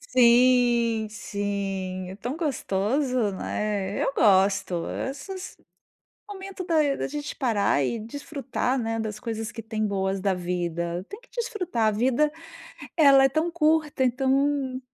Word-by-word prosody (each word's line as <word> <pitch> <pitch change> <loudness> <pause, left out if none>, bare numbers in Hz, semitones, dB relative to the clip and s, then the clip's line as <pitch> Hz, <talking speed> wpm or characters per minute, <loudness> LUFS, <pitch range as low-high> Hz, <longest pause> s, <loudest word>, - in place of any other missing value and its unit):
sim, 240 -3 +4
sim, 195 -3 -4
é 190 - -8
tão 245 +8 -4
gostoso, 250 - 0
né. 200 0 -2
Eu - - 0
gosto, 190 -3 +3 0.3
esses 370 +7 -8 0.7
momento 390 -2 -7
da 305 -5 +2
da - - -3
gente 295 +1 -5
parar 210 - +1
e 230 - -1
desfrutar, 270 +1 -3
né, 225 -1 -2
das 215 -1 -4
coisas 225 -2 -4
que 225 - -7
tem 215 0 -2
boas 195 -1 -1
da 195 -1 +1
vida. 175 0 -3
Tem 410 - -8
que - - -22
desfrutar, 365 - -1
a - - +3
vida 260 +7 +2 0.7
ela 275 -4 +7
é - - +6
tão 315 +5 0
curta, 310 -4 +1
então, 265 +1 +1
235 Hz, 135 wpm, -26 LUFS, 200-285 Hz, 0.7 s, ela